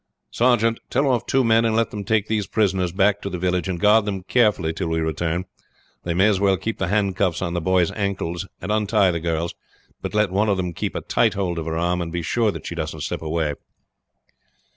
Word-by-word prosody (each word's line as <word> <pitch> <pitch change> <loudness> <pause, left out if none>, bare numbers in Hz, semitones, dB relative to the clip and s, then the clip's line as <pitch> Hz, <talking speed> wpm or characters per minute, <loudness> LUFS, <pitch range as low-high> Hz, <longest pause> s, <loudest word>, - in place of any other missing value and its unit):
"Sergeant, 115 -2 +2
tell 140 +3 +1
off 125 -4 +1
two 135 0 +2
men 115 -1 +4
and 115 -1 +1
let 115 -1 +1
them 105 -1 -5
take 105 +1 +1
these 110 -2 -1
prisoners 95 -5 +1
back 100 +2 +2
to 100 - -4
the 90 - -4
village, 90 +1 0
and 90 -2 -3
guard 105 +2 +5
them 100 -3 -3
carefully 100 -7 +2
till 90 +1 -3
we 80 0 0
return. 80 +2 -1 0.6
They 85 -1 -1
may 95 +4 +4
as 100 -3 +2
well 100 -1 +3
keep 110 +4 -4
the 95 - 0
handcuffs 100 -3 +1
on 85 -2 -2
the 85 - -1
boy's 90 -1 +2
ankles, 95 -3 -3
and 100 - -4
untie 105 -3 +3
the 85 - -2
girl's; 85 0 -2 0.5
but - - -5
let 105 -3 +2
one 105 +3 +1
of 100 - +2
them 90 -2 -2
keep - - -4
a - - -2
tight - - +1
hold 90 -4 -1
of 80 - -5
her 80 0 -2
arm, 90 +1 0
and 85 -1 -4
be 85 0 -3
sure 115 +6 +1
that - - -6
she - - -4
doesn't - - -4
slip - - -3
away." 80 -1 -1
95 Hz, 230 wpm, -22 LUFS, 85-105 Hz, 0.6 s, guard